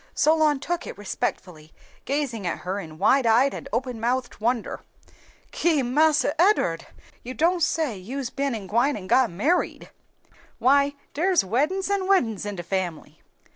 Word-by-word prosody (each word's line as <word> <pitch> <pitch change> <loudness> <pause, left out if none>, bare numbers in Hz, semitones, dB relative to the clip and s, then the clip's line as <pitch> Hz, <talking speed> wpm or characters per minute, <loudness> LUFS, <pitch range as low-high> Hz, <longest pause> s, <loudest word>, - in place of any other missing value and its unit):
Solon 310 -2 +3
took 345 +4 -3
it - - -8
respectfully, 180 -5 -5 0.3
gazing 260 -8 -2
at 170 - -3
her 190 +2 -2
in 160 -5 -9
wide 265 +7 +3
eyed 245 +5 +4
and - - -8
open 245 0 -2
mouthed 245 0 -2
wonder. 235 +1 -1 0.7
"Ki! 315 -5 +1
Marse 300 +5 +3
Ed'ard, 255 - +2 0.3
you 255 +2 -7
don' 345 +3 +2
say 320 - 0
you's 250 +7 -5
ben 275 -2 -2
an' 210 -3 -6
gwine 235 +8 +1
an' 190 - -8
got 255 +5 +3
married! 280 - -1 0.7
Why 280 +2 +3 0.2
dere's 360 +4 +2
weddin's 300 - 0
an' 390 -2 0
weddin's 225 - +1
in 205 - -4
de 175 - -6
family!" 170 -5 -4
255 Hz, 155 wpm, -24 LUFS, 205-300 Hz, 0.7 s, eyed